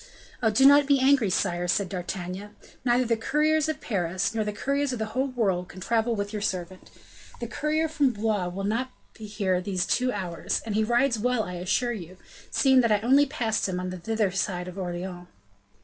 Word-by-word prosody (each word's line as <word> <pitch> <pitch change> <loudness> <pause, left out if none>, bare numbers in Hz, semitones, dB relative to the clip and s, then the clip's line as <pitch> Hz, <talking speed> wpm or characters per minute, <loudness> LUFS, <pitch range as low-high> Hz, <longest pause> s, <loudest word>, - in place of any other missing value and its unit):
"Oh! 225 - +3
do 220 +5 +4
not 285 0 +7
be 280 -1 +4
angry, 260 -5 +4
sire," 180 -2 0
said 195 +2 +1
D'Artagnan; 185 +2 -5 0.3
"neither 250 0 +2
the 230 0 +2
couriers 305 +6 +1
of 310 - -2
Paris, 190 +1 -1
nor 220 -1 0
the 210 - -2
couriers 275 +6 -1
of 250 - -3
the 220 - -2
whole 260 +3 +1
world, 195 -8 -1
can 185 - -11
travel 230 +4 0
with 200 0 -4
your 210 - -3
servant; 185 -2 -4 0.5
the - - -4
courier 310 +1 -1
from 300 -3 +2
Blois 210 -4 -1
will 190 +2 -5
not 230 +6 -1 0.2
be 220 -2 -9
here 195 -4 0
these 185 -1 -1
two 255 0 +1
hours, 180 -6 -2
and 220 - -3
he 215 +1 +2
rides 240 +1 +2
well, 245 0 +1
I 180 - -6
assure 190 +7 0
you, 185 -4 -9 0.3
seeing 265 -2 +4
that 230 -2 +1
I 210 - +4
only 275 +5 +4
passed 225 -8 -1
him 180 -1 -2
on 180 0 -4
the 185 - -6
thither 220 0 0
side 180 -1 -2
of 180 - -8
Orleans." 175 0 -5
215 Hz, 210 wpm, -26 LUFS, 185-250 Hz, 0.5 s, not